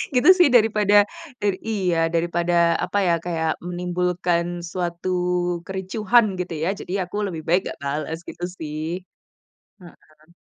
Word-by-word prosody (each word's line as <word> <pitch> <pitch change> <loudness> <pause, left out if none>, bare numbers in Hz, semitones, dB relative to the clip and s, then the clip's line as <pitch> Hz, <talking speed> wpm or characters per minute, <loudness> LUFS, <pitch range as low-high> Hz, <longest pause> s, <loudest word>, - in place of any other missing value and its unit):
Gitu 250 +9 +5
sih. 350 - +7
Daripada 210 -2 +4 0.7
iya, 190 -6 0 0.2
daripada, 170 +1 0 0.3
apa 190 - -2
ya, 170 - +4
kayak 160 -2 -1
menimbulkan 180 -1 0 0.3
suatu 175 0 -3 0.6
kericuhan 210 +5 +2
gitu 180 -2 -3
ya, 175 - +1
jadi 180 - -6
aku 180 +3 -9
lebih 165 -4 -5
baik 175 +3 +4
nggak - - -7
bales, 150 +3 -3
gitu 175 - -9
sih. 155 -1 -5 1.0
Heeh. 155 -2 -18
175 Hz, 125 wpm, -23 LUFS, 165-190 Hz, 1.0 s, sih